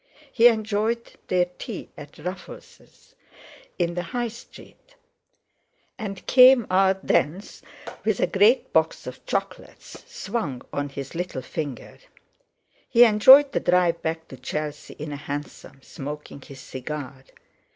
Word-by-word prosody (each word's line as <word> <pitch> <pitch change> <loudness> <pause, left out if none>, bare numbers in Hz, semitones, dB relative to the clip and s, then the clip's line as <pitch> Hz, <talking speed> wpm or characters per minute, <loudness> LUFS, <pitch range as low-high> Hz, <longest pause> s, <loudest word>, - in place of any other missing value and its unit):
He 235 0 +6
enjoyed 220 +1 0 0.2
their 180 -1 +2
tea 220 -6 -7
at 145 0 -12
Ruffel's 180 +1 -10 0.6
in 175 -1 0
the 175 - -2
High 240 +7 -3
Street, 245 - -16 1.0
and 195 -4 -6
came 255 -2 +7
out 190 0 +2
thence 175 +8 -1 0.4
with - - 0
a - - +3
great 440 +4 +3
box - - +1
of - - -9
chocolates - - -5
swung 145 - -4
on 145 0 -2
his 135 0 -8
little 175 -6 -4
finger. 145 -3 -6 0.9
He 235 - +7
enjoyed 260 +6 +7
the - - 0
drive 175 -2 +2
back 160 0 -4
to 130 - -10
Chelsea 150 +3 -6
in 150 0 -7
a 145 - -5
hansom, 140 -1 -8
smoking 145 0 -8
his 135 0 -12
cigar. 135 0 -7
175 Hz, 130 wpm, -24 LUFS, 145-220 Hz, 1.0 s, came